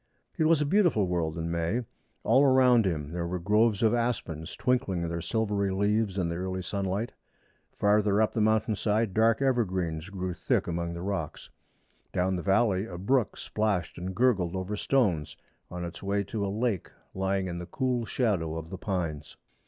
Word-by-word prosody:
It 160 Hz, -, +1 dB
was 160 Hz, -1 st, +4 dB
a -, -, -1 dB
beautiful 170 Hz, -, +3 dB
world 85 Hz, -3 st, -1 dB
in 85 Hz, 0 st, -3 dB
May. 85 Hz, +9 st, -1 dB, 0.4 s
All 135 Hz, -, +4 dB
around 130 Hz, -4 st, +5 dB
him 75 Hz, -4 st, -3 dB
there 85 Hz, 0 st, -3 dB
were 90 Hz, +1 st, -2 dB
groves 105 Hz, +4 st, +2 dB
of 110 Hz, 0 st, +4 dB
aspens 95 Hz, -9 st, -2 dB
twinkling 100 Hz, -10 st, 0 dB
their 85 Hz, 0 st, -3 dB
silvery 105 Hz, -1 st, 0 dB
leaves 100 Hz, +1 st, +1 dB
in 90 Hz, -3 st, +1 dB
the 85 Hz, 0 st, -3 dB
early 95 Hz, 0 st, -3 dB
sunlight. 100 Hz, +4 st, -2 dB, 0.7 s
Farther 105 Hz, 0 st, +3 dB
up 110 Hz, -, +2 dB
the 110 Hz, -, 0 dB
mountain 110 Hz, 0 st, +2 dB
side 105 Hz, 0 st, 0 dB
dark 115 Hz, +4 st, +3 dB
evergreens 95 Hz, -10 st, 0 dB
grew 95 Hz, -2 st, -4 dB
thick -, -, 0 dB
among 85 Hz, 0 st, -3 dB
the 85 Hz, -, -6 dB
rocks. 95 Hz, -6 st, -4 dB, 0.6 s
Down 95 Hz, +1 st, +1 dB
the 90 Hz, -, -3 dB
valley 100 Hz, +1 st, +2 dB
a 85 Hz, -, -7 dB
brook 120 Hz, +5 st, +1 dB
splashed 100 Hz, -7 st, -1 dB
and 90 Hz, +1 st, -5 dB
gurgled 100 Hz, -8 st, +2 dB
over 95 Hz, +3 st, -3 dB
stones 95 Hz, -, 0 dB, 0.3 s
on 90 Hz, 0 st, -5 dB
its 85 Hz, -, -8 dB
way 100 Hz, +1 st, 0 dB
to 100 Hz, +1 st, -4 dB
a -, -, 0 dB
lake 105 Hz, -2 st, -1 dB, 0.2 s
lying 95 Hz, 0 st, 0 dB
in 85 Hz, -1 st, -4 dB
the 90 Hz, -, -7 dB
cool 125 Hz, +4 st, -1 dB
shadow 95 Hz, -9 st, 0 dB
of 80 Hz, +1 st, -7 dB
the 95 Hz, -, -6 dB
pines. 85 Hz, -7 st, -3 dB
100 Hz, 180 wpm, -28 LUFS, 85-110 Hz, 0.7 s, around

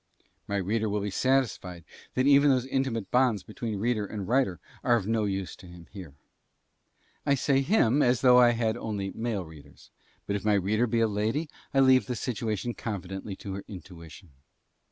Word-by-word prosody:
My 100 Hz, -, -2 dB
reader 105 Hz, +3 st, -1 dB
will 105 Hz, 0 st, -1 dB
be 100 Hz, 0 st, -3 dB
satisfied 115 Hz, -8 st, 0 dB, 0.3 s
that 130 Hz, -, +2 dB
even 140 Hz, +1 st, +6 dB
those 130 Hz, -2 st, +2 dB
intimate 130 Hz, -6 st, -2 dB
bonds 125 Hz, -5 st, +2 dB
between 110 Hz, -1 st, -5 dB
reader 110 Hz, +1 st, 0 dB
and 100 Hz, -2 st, -6 dB
writer 120 Hz, -8 st, +1 dB, 0.2 s
are 120 Hz, -, +4 dB
of 110 Hz, -5 st, -1 dB
no 110 Hz, 0 st, 0 dB
use 95 Hz, -4 st, -3 dB
to 90 Hz, -, -14 dB
him 85 Hz, -1 st, -13 dB
here. 90 Hz, -9 st, -10 dB, 1.1 s
I 140 Hz, -1 st, +2 dB
say 135 Hz, +1 st, +2 dB
him 140 Hz, -, +3 dB
as 125 Hz, -2 st, +2 dB
though 125 Hz, -1 st, +7 dB
I 120 Hz, -1 st, +6 dB
had 115 Hz, -1 st, 0 dB
only 100 Hz, -4 st, -4 dB
male 110 Hz, -5 st, -3 dB
readers, 75 Hz, -3 st, -16 dB, 0.3 s
but 100 Hz, -, -2 dB
if 100 Hz, -, -3 dB
my 105 Hz, -1 st, +3 dB
reader 105 Hz, +5 st, +1 dB
be 115 Hz, 0 st, +1 dB
a 115 Hz, -, +4 dB
lady 110 Hz, +9 st, -1 dB, 0.2 s
I 135 Hz, -, +3 dB
leave 130 Hz, 0 st, +5 dB
the 125 Hz, -, -2 dB
situation 115 Hz, -1 st, -3 dB
confidently 95 Hz, -2 st, -6 dB
to 95 Hz, 0 st, -7 dB
her 100 Hz, -, -6 dB
intuition. 90 Hz, -3 st, -12 dB
110 Hz, 185 wpm, -28 LUFS, 95-125 Hz, 1.1 s, though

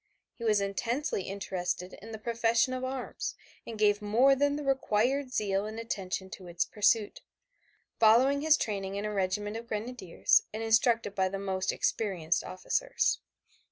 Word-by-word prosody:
He 235 Hz, -, -11 dB
was 215 Hz, -2 st, +3 dB
intensely 230 Hz, -, -2 dB
interested 185 Hz, -2 st, -3 dB
in 225 Hz, +3 st, -10 dB
the 220 Hz, -, -5 dB
profession 235 Hz, +2 st, +1 dB
of 255 Hz, 0 st, -4 dB
arms 260 Hz, -1 st, -4 dB, 0.3 s
and 225 Hz, -, -6 dB
gave 210 Hz, 0 st, +3 dB
more 240 Hz, +7 st, +4 dB
than 285 Hz, +1 st, +1 dB
the 295 Hz, -, -4 dB
required 265 Hz, 0 st, +1 dB
zeal 200 Hz, -3 st, 0 dB
and 220 Hz, +1 st, -7 dB
attention 190 Hz, -4 st, -4 dB
to 190 Hz, -4 st, -9 dB
its 175 Hz, 0 st, -1 dB
pursuit, 210 Hz, 0 st, +1 dB, 0.8 s
following 250 Hz, +6 st, +5 dB
his 310 Hz, 0 st, +5 dB
training 195 Hz, -2 st, -3 dB
in 200 Hz, +1 st, -3 dB
a 210 Hz, -, -3 dB
regiment 205 Hz, +2 st, -1 dB
of 230 Hz, +1 st, -9 dB
Grenadiers, 220 Hz, -4 st, +1 dB
and 220 Hz, +1 st, -4 dB
instructed 225 Hz, -1 st, +2 dB
by 190 Hz, -2 st, +1 dB
the 195 Hz, -, -4 dB
most 190 Hz, -1 st, -1 dB
experienced 175 Hz, -7 st, 0 dB
officers. -, -, -1 dB
215 Hz, 155 wpm, -30 LUFS, 195-245 Hz, 0.8 s, following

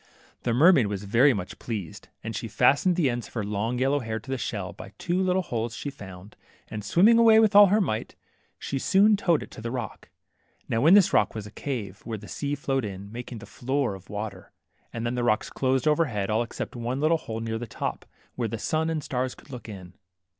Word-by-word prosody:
The 120 Hz, -, -1 dB
mermaid 145 Hz, -, +6 dB
was 100 Hz, -1 st, -4 dB
very 120 Hz, +8 st, +4 dB
much 100 Hz, -6 st, -5 dB
pleased, 105 Hz, -9 st, -6 dB, 0.2 s
and -, -, -5 dB
she -, -, -4 dB
fast 145 Hz, +6 st, +3 dB
ened 180 Hz, -, +3 dB
the 170 Hz, -5 st, +2 dB
ends 120 Hz, -1 st, -2 dB
of -, -, -20 dB
her 110 Hz, -, -1 dB
long 105 Hz, +4 st, -2 dB
yellow 135 Hz, +3 st, +2 dB
hair 110 Hz, -3 st, -4 dB
to 125 Hz, -, -9 dB
the -, -, +1 dB
shell -, -, -4 dB
by -, -, -11 dB
two 175 Hz, +2 st, -1 dB
little 185 Hz, 0 st, +1 dB
holes 115 Hz, -6 st, -3 dB
she 145 Hz, -, -5 dB
found, 95 Hz, -3 st, -11 dB, 0.3 s
and 110 Hz, -1 st, -5 dB
swimming 210 Hz, -, +5 dB
away 225 Hz, -1 st, +7 dB
with 215 Hz, -2 st, +3 dB
all 205 Hz, 0 st, +10 dB
her 205 Hz, +3 st, +3 dB
might, 110 Hz, -, -2 dB, 0.4 s
she 135 Hz, -, -3 dB
soon 205 Hz, +7 st, +4 dB
towed 175 Hz, -6 st, +1 dB
it -, -, -13 dB
to -, -, -10 dB
the 115 Hz, -, -4 dB
rock. 120 Hz, -3 st, -6 dB, 0.6 s
Now 115 Hz, +7 st, +1 dB
in 180 Hz, -, +8 dB
this 195 Hz, -1 st, +5 dB
rock 105 Hz, +1 st, +3 dB
was 110 Hz, -2 st, -5 dB
a 105 Hz, -, -10 dB
cave, 110 Hz, -8 st, -5 dB
where 115 Hz, -1 st, -4 dB
the 105 Hz, 0 st, -11 dB
sea 145 Hz, 0 st, -3 dB
flowed 135 Hz, -2 st, -1 dB
in, 100 Hz, -1 st, -7 dB
making 120 Hz, -1 st, -7 dB
a -, -, -8 dB
floor 130 Hz, +3 st, -2 dB
of 95 Hz, 0 st, -12 dB
water, 105 Hz, -2 st, -6 dB, 0.4 s
and 115 Hz, 0 st, -4 dB
then 120 Hz, -, -1 dB
the 125 Hz, -1 st, -1 dB
rocks 110 Hz, -3 st, +1 dB
closed 130 Hz, +2 st, 0 dB
overhead, 130 Hz, -11 st, +1 dB
all 110 Hz, +2 st, +2 dB
except 120 Hz, -, -5 dB
one 120 Hz, +2 st, -3 dB
little 155 Hz, +3 st, +3 dB
hole 110 Hz, -5 st, -5 dB
near 115 Hz, 0 st, -3 dB
the 120 Hz, -, -6 dB
top, -, -, -4 dB, 0.3 s
where 120 Hz, -2 st, -2 dB
the 115 Hz, -, -4 dB
sun 160 Hz, +7 st, -1 dB
and 160 Hz, -2 st, -1 dB
the -, -, -11 dB
stars 125 Hz, 0 st, -2 dB
could -, -, -17 dB
look 125 Hz, -3 st, -8 dB
in. 90 Hz, -4 st, -9 dB
120 Hz, 235 wpm, -26 LUFS, 110-150 Hz, 0.6 s, all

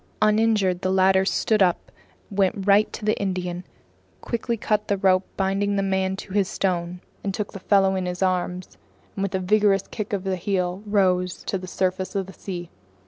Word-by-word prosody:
Uninjured, 215 Hz, -4 st, +2 dB
the 185 Hz, -, 0 dB
latter 190 Hz, 0 st, +4 dB
stood 215 Hz, +2 st, +1 dB
up, 180 Hz, -2 st, +1 dB, 0.4 s
went 195 Hz, 0 st, 0 dB
right 205 Hz, +1 st, +4 dB
to 215 Hz, -, -7 dB
the 215 Hz, -, +2 dB
Indian, 180 Hz, -2 st, -2 dB, 0.6 s
quickly 235 Hz, 0 st, -2 dB
cut 210 Hz, 0 st, 0 dB
the 200 Hz, -, +1 dB
rope 190 Hz, -1 st, +3 dB
binding 195 Hz, +1 st, 0 dB
the 195 Hz, -, +1 dB
man 190 Hz, -1 st, 0 dB
to 190 Hz, -, -9 dB
his 200 Hz, -2 st, +2 dB
stone, 180 Hz, -2 st, -2 dB, 0.3 s
took 205 Hz, +2 st, -4 dB
the 195 Hz, -, -7 dB
fellow 195 Hz, 0 st, +3 dB
in 185 Hz, -1 st, -2 dB
his 180 Hz, +1 st, -2 dB
arms, 180 Hz, -1 st, -2 dB, 0.4 s
and 195 Hz, -, -4 dB
with 195 Hz, 0 st, -1 dB
a -, -, +1 dB
vigorous 200 Hz, 0 st, +3 dB
kick 215 Hz, -2 st, -4 dB
of 200 Hz, -3 st, -1 dB
the 190 Hz, -1 st, -1 dB
heel, 180 Hz, 0 st, -1 dB
rose 180 Hz, -3 st, +1 dB
to -, -, -2 dB
the 185 Hz, -, -8 dB
surface 185 Hz, +1 st, -2 dB
of 195 Hz, -1 st, 0 dB
the 190 Hz, -, -11 dB
sea. 175 Hz, -3 st, -7 dB
190 Hz, 190 wpm, -24 LUFS, 185-200 Hz, 0.6 s, latter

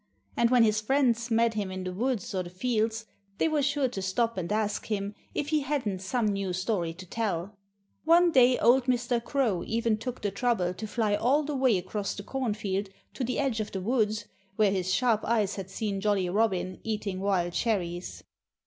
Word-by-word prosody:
And 235 Hz, -, +3 dB
when 245 Hz, -2 st, +5 dB
his 215 Hz, -1 st, +2 dB
friends 245 Hz, -1 st, +1 dB
met 230 Hz, 0 st, +3 dB
him 205 Hz, -3 st, -2 dB
in 185 Hz, 0 st, -5 dB
the 185 Hz, 0 st, -4 dB
woods 230 Hz, 0 st, -2 dB
or 185 Hz, -, 0 dB
the 175 Hz, -, -7 dB
fields 220 Hz, +3 st, -1 dB, 0.3 s
they -, -, +2 dB
were 310 Hz, -2 st, +1 dB
sure 280 Hz, -1 st, +1 dB
to 200 Hz, -5 st, -5 dB
stop 230 Hz, +5 st, 0 dB
and 185 Hz, 0 st, -4 dB
ask 210 Hz, -1 st, -1 dB
him 205 Hz, -1 st, -2 dB, 0.2 s
if 295 Hz, -, -1 dB
he 310 Hz, -1 st, +3 dB
hadn't 260 Hz, -9 st, -2 dB
some 220 Hz, +5 st, -1 dB
new 195 Hz, -3 st, -1 dB
story 180 Hz, -2 st, -1 dB
to 185 Hz, +1 st, -10 dB
tell. 200 Hz, -1 st, -3 dB, 0.5 s
One 340 Hz, +2 st, +5 dB
day 255 Hz, -3 st, +5 dB
old 245 Hz, +1 st, +4 dB
Mr. 245 Hz, -2 st, 0 dB
Crow 240 Hz, -10 st, 0 dB
even 230 Hz, -1 st, 0 dB
took 250 Hz, 0 st, -6 dB
the 205 Hz, -, 0 dB
trouble 200 Hz, -4 st, 0 dB
to 215 Hz, +4 st, -6 dB
fly 215 Hz, -1 st, 0 dB
all 255 Hz, +8 st, +2 dB
the 295 Hz, 0 st, -3 dB
way 260 Hz, -6 st, +3 dB
across 195 Hz, +3 st, -3 dB
the 200 Hz, -, -7 dB
cornfield 210 Hz, -6 st, -2 dB, 0.2 s
to 265 Hz, -, -3 dB
the 250 Hz, +1 st, -1 dB
edge 265 Hz, -5 st, 0 dB
of 215 Hz, -1 st, -3 dB
the 190 Hz, -, -2 dB
woods, 215 Hz, -1 st, 0 dB, 0.3 s
where 210 Hz, -2 st, +3 dB
his 185 Hz, -1 st, -1 dB
sharp 230 Hz, 0 st, +2 dB
eyes 215 Hz, -3 st, +1 dB
had 190 Hz, -1 st, -6 dB
seen 200 Hz, 0 st, -3 dB
Jolly 200 Hz, -3 st, +1 dB
Robin 190 Hz, -2 st, 0 dB
eating 210 Hz, -4 st, -3 dB
wild 185 Hz, -3 st, 0 dB
cherries. 180 Hz, -6 st, -2 dB
215 Hz, 200 wpm, -28 LUFS, 195-245 Hz, 0.5 s, when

